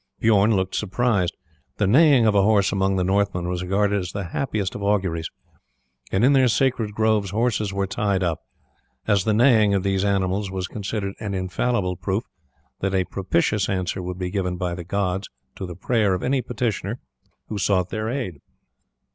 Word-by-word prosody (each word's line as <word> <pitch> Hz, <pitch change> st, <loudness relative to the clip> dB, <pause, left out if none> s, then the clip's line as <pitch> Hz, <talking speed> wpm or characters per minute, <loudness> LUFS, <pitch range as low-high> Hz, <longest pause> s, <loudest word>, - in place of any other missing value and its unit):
Bijorn 110 Hz, 0 st, +4 dB
looked 95 Hz, -1 st, -1 dB
surprised. 105 Hz, -3 st, 0 dB, 0.4 s
The 105 Hz, -, +2 dB
neighing 135 Hz, -, +5 dB
of 110 Hz, -, +4 dB
a 100 Hz, -, +4 dB
horse 100 Hz, -1 st, +3 dB
among 95 Hz, 0 st, +1 dB
the 95 Hz, -, +1 dB
Northmen 95 Hz, -2 st, 0 dB
was 90 Hz, 0 st, -2 dB
regarded 100 Hz, +2 st, +1 dB
as 90 Hz, -1 st, -5 dB
the 100 Hz, -, -3 dB
happiest 105 Hz, -4 st, -2 dB
of -, -, -6 dB
auguries, 95 Hz, -5 st, 0 dB, 0.8 s
and 100 Hz, +5 st, +3 dB
in 140 Hz, -, +5 dB
their 130 Hz, -2 st, +5 dB
sacred 115 Hz, -4 st, 0 dB
groves 110 Hz, -2 st, +2 dB
horses 110 Hz, 0 st, 0 dB
were 100 Hz, 0 st, -1 dB
tied 100 Hz, -1 st, -1 dB
up, 85 Hz, -3 st, -1 dB, 0.7 s
as 100 Hz, -2 st, +2 dB
the 110 Hz, -, +2 dB
neighing 110 Hz, -4 st, +5 dB
of 95 Hz, -, 0 dB
these 95 Hz, -1 st, 0 dB
animals 100 Hz, 0 st, 0 dB
was 95 Hz, -1 st, -3 dB
considered 100 Hz, -1 st, -4 dB
an 105 Hz, -3 st, -4 dB
infallible 95 Hz, 0 st, -1 dB
proof -, -, -2 dB, 0.6 s
that 95 Hz, 0 st, -1 dB
a 95 Hz, -, +2 dB
propitious 95 Hz, +2 st, 0 dB
answer 95 Hz, 0 st, -2 dB
would 90 Hz, 0 st, -5 dB
be 90 Hz, -1 st, -3 dB
given 90 Hz, -2 st, -2 dB
by 90 Hz, -1 st, -2 dB
the 85 Hz, 0 st, -6 dB
gods 95 Hz, +1 st, -2 dB, 0.3 s
to 95 Hz, -, -6 dB
the 90 Hz, -, -7 dB
prayer 105 Hz, 0 st, +1 dB
of 90 Hz, -, -5 dB
any 130 Hz, 0 st, +1 dB
petitioner 115 Hz, -3 st, -3 dB, 0.5 s
who 105 Hz, -, -3 dB
sought 90 Hz, -1 st, +1 dB
their 110 Hz, 0 st, -2 dB
aid. 115 Hz, -, -4 dB
100 Hz, 180 wpm, -23 LUFS, 95-110 Hz, 0.8 s, neighing